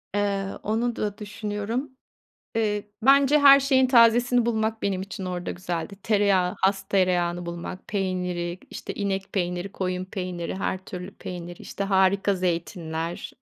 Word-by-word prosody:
Eee, 200 -1 0 0.2
onu 230 +2 0
da 205 -1 -3
düşünüyorum. 210 +5 -4 0.6
Eee, 210 -2 -1
bence 275 +4 +5
her 275 -1 +9
şeyin 265 -1 +3
tazesini 240 0 +5
bulmak 220 -1 0
benim 195 -2 -1
için 195 0 -6
orada 180 -1 -3
güzeldi. 175 +2 -4
Tereyağı, 200 -4 +2
has 195 0 +1
tereyağını 175 -2 +1
bulmak; 170 +2 -6
peyniri, 180 -3 -2
işte - - -6
inek 195 -1 -3
peyniri, 180 0 -2
koyun 185 -1 -2
peyniri, 180 -2 -4
her 190 0 -1
türlü 180 +1 -7
peyniri; 175 -1 -7
işte 200 - -5
harika 195 0 +3
zeytinler. 170 -2 -3
195 Hz, 135 wpm, -25 LUFS, 180-220 Hz, 0.6 s, her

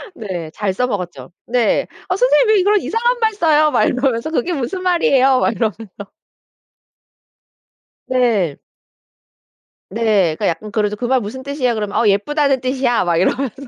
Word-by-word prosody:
네. 180 - -6
잘 195 +2 -2
써먹었죠. 180 - -4 0.2
네. 240 -2 +1 0.2
"어 370 - +1
선생님 - - +3
왜 375 - +2
그런 410 +1 +3
이상한 480 +2 -1
말 445 -2 +1
써요?" 310 -5 +3
말 - - +2
그러면서 255 +1 -1
"그게 330 +3 -1
무슨 335 +6 -3
말이에요?" 270 -7 +3
막 - - +1
이러면서. 220 -1 -3 2.2
네. 225 - +1 1.3
네. 200 -6 +1
그러니까 - - -2
약간 210 +5 -3
그러죠. 210 -1 -1
"그 245 - -4
말 255 0 +1
무슨 245 +6 -7
뜻이야?" 265 -3 -1
그러면 210 -2 -4
"어. 235 - +2
예쁘다는 270 +7 +1
뜻이야." 255 -3 0
막 170 -1 +1
이러면서. 265 +8 -1
250 Hz, 315 characters per minute, -18 LUFS, 210-295 Hz, 2.2 s, 선생님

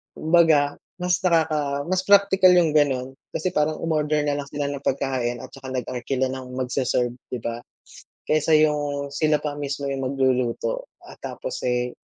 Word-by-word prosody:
Kumbaga, 155 -3 +3 0.2
mas 180 0 +2
nakaka 155 -5 +1
mas 185 0 0
praktikal 195 -2 +6
yung 175 -2 +4
gano'n 135 -3 +1 0.2
kasi 185 +4 -1
parang 155 -2 0
umorder 150 -2 +1
na 145 -1 0
lang 145 - -4
sila 140 0 -3
ng 140 -1 -6
pagkain 125 -3 -1
at 130 - -9
saka 130 -1 -9
nag-arkila 130 +1 -2
ng 130 -1 -7
magse-serve, 125 -1 -1 0.2
'di 125 - -3
ba? 115 +1 -4 0.6
Kaysa 155 +1 +2
yung 145 -2 +1
sila 150 +1 +1
pa 145 -1 -4
mismo 140 -1 -3
yung 135 -1 -2
magluluto 130 - 0 0.2
at - - -13
tapos, - - -6
eh, 125 0 0
145 Hz, 160 wpm, -23 LUFS, 130-155 Hz, 0.6 s, praktikal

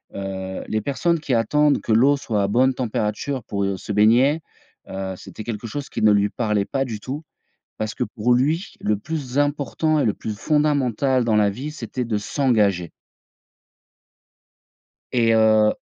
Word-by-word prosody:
heu: 95 -1 -5
«Les 110 - -1
personnes 165 +7 0
qui 140 -4 -2
attendent 145 +6 +3
que - - -3
l'eau 135 +6 +5
soit 110 -6 -1
à 100 - +1
bonne 130 +5 +3
température 120 +2 -2
pour, 100 -1 -2
heu, 100 -1 -1
se 100 - -7
baigner», 120 +9 +4 0.5
heu, 95 0 -4
c'était 110 - -9
quelque 115 0 -5
chose 140 +5 -5
qui - - -4
ne 105 -1 +6
lui 100 0 +3
parlait 105 -4 0
pas 135 +4 -1
du 110 -4 -5
tout 140 +7 -6 0.6
parce 110 0 -3
que - - -1
pour 110 +3 0
lui, 155 +8 0
le 105 0 +1
plus 140 +1 -4
important 145 +2 +1
et - - +1
le 105 - +1
plus 110 - -5
fondamental 140 -4 +1
dans 110 -2 +2
la 105 -1 +4
vie, 135 +9 -6
c'était 125 -3 -5
de 110 -2 -1
s'engager. 105 - +1 2.2
Et 115 -2 +3
heu 110 -1 +4
115 Hz, 170 wpm, -22 LUFS, 105-140 Hz, 2.2 s, ne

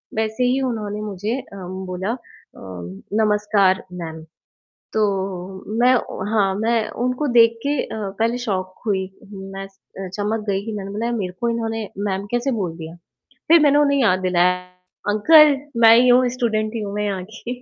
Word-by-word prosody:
वैसे 220 +2 -1
ही 255 +2 +1
उन्होंने 210 -2 -4
मुझे 210 +4 -3
अ, 250 -6 -12 0.3
बोला 185 +4 -2
अ, 245 - -3 1.0
"नमस्कार 210 -3 +2 0.2
मैम।" 160 -1 -6 0.7
तो, 215 - +2 0.8
मैं 250 +1 +5 0.4
हाँ, 200 -3 +2
मैं 225 -1 +1 0.2
उनको 255 +4 -1
देख 230 0 +5
के 290 -1 +1
अ, 210 -3 -5
पहले 230 +2 +1
शॉक 185 -2 -2
हुई, 190 -2 +1 0.3
मैं 195 0 -7
स 195 0 -30 0.2
अ, 190 - -4
चमक 210 +1 -2
गई, 195 +1 -1
कि 225 - -4
मैंने 195 0 -6
बोला 215 +3 -3
यार, 240 - -1
मेरे 185 -4 -3
को 235 - +1
इन्होंने 225 -2 -2 0.2
मैम 190 +1 -2
कैसे 240 +3 0
बोल 170 -3 -3
दिया। 165 +1 -8 0.5
फ़िर 335 0 +8
मैंने 290 -1 +5
उन्हें 280 -1 +3
याद 185 -5 +3
दिलाया, 180 0 +3 0.5
"अंकल, 295 +7 +6 0.2
मैं 225 0 +9
ही 250 +1 +5
हूँ, 250 +1 +5
स्टूडेंट 220 -3 -1
ही 225 - -2
हूँ 200 -1 -5
मैं 210 - -1
यहाँ 195 -3 -2
की" 235 +2 -6
215 Hz, 175 wpm, -21 LUFS, 195-235 Hz, 1.0 s, मैं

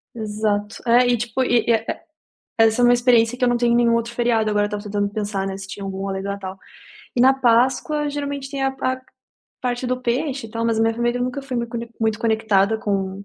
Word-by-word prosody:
Exato, 210 -1 -2
é 245 +2 +5
e 245 0 +3
tipo, 240 +3 -1
e, 245 -2 +2
é 225 -1 +2
é - - -7 0.7
essa 225 +2 +2
é - - +7
uma 245 - +6
experiência 240 -1 +3
que 250 - -4
eu 250 - +5
não 240 - +2
tenho 235 0 +2
nenhum 235 -1 +4
outro 230 0 -2
feriado, 235 -2 +1
agora 205 0 +2
eu - - -1
estava 205 0 -5
tentando 205 -1 -1
pensar 205 -2 -2
não 190 - -4
se 195 -1 -8
tinha 200 0 -7
algum 195 0 -4
além 190 0 -3
do 200 - -4
Natal, 195 -1 -5 0.6
e - - +2
na 265 - +7
páscoa 265 +4 +2
geralmente 285 -1 -4
tem 275 -1 -3
a 270 - +2
pa 265 -1 -2
a - - -15 0.6
parte 250 0 -2
do 255 0 -1
peixe 255 +1 -2
e - - -15
tal 230 +1 -3
mas 225 -1 +1
a - - +3
minha 225 0 +2
família 240 +1 -1
nunca 255 +2 -2
foi 265 -2 -4
mui 235 0 -1
cone 235 0 -6
muito 220 -1 +1
conectada 220 -2 +2
com 195 -2 -2
230 Hz, 245 wpm, -21 LUFS, 210-245 Hz, 0.7 s, é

